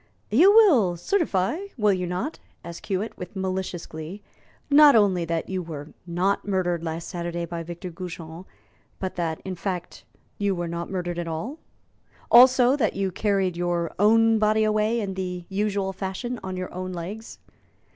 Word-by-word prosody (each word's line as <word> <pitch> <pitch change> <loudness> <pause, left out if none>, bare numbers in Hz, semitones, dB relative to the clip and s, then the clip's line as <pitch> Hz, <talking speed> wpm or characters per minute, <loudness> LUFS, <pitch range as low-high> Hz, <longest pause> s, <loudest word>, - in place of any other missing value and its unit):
"You 335 - +7
will 280 - +5
certify, 200 - 0 0.2
will 210 -3 +3
you 180 -1 -2
not," 180 - -3 0.2
asked 170 0 -9
Hewitt, 200 +2 -2
with 180 - -8
malicious 190 -2 -3
glee, 160 +6 -8 0.4
"not 290 -1 +7
only 190 -5 +3
that 165 0 -2
you 190 -1 -2
were 155 -3 -7 0.2
not 180 +4 0
murdered 175 -4 0
last 165 0 -4
Saturday 170 0 -4
by 170 0 -5
Victor 175 +2 -7
Goujon, 170 0 -8 0.5
but 190 -1 -4
that, 165 -3 -2
in 190 - -3
fact, 180 -1 -5 0.4
you 200 -1 +1
were 175 -1 -3
not 170 +1 -4
murdered 175 -2 -3
at 170 - -4
all? 215 - -5 0.7
Also, 255 +1 +7
that 280 - 0
you 195 -1 -1
carried 195 -2 0
your 175 -1 -1
own 225 +2 +5
body 215 0 +3
away 215 +2 +1
in 200 -3 -3
the 180 -2 -4
usual 195 -1 -1
fashion, 195 +6 -4
on 185 -1 -5
your 185 0 -5
own 185 +1 -4
legs." 195 +6 -7
185 Hz, 165 wpm, -25 LUFS, 175-215 Hz, 0.7 s, You